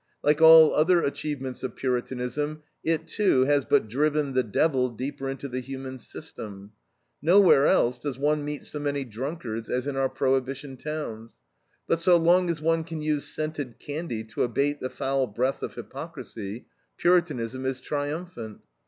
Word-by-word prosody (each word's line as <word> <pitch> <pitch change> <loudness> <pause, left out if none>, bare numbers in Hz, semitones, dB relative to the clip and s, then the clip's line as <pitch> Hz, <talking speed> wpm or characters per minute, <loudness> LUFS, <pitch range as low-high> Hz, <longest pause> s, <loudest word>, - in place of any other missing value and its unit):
Like 150 +2 +3
all 160 -1 +9
other 170 +3 +4
achievements 140 -3 -3
of 130 -3 -4
Puritanism 130 +4 -2 0.2
it, 165 0 0
too, 200 -11 +2
has 145 0 +2
but - - +3
driven 145 +3 0
the 130 - +3
"devil" 125 +3 +1
deeper 135 +3 -5
into 135 +1 -5
the 130 -1 -3
human 130 0 -7
system. 100 -3 -8 0.5
Nowhere 175 -3 +6
else 120 +1 +3
does 135 0 -4
one 150 +2 +1
meet 150 0 -4
so 150 - -6
many 145 -1 -1
drunkards 120 -1 -5
as 125 +1 -1
in 140 -1 -3
our 135 0 +1
Prohibition 135 +1 -1
towns. 130 -6 -6 0.5
But 165 - +2
so 175 +1 +5
long 175 +2 +4
as 165 -2 -1
one 165 +1 +1
can 160 -2 -6
use 150 -2 0
scented 150 -6 -4
candy 145 -6 -5
to 110 - -5
abate 140 +4 +1
the 130 - -3
foul 135 0 -1
breath 125 +6 -1
of - - -5
hypocrisy, 130 -8 -7 0.3
Puritanism 145 -9 +1
is 130 -1 -2
triumphant. 145 - -5
140 Hz, 160 wpm, -26 LUFS, 125-155 Hz, 0.5 s, all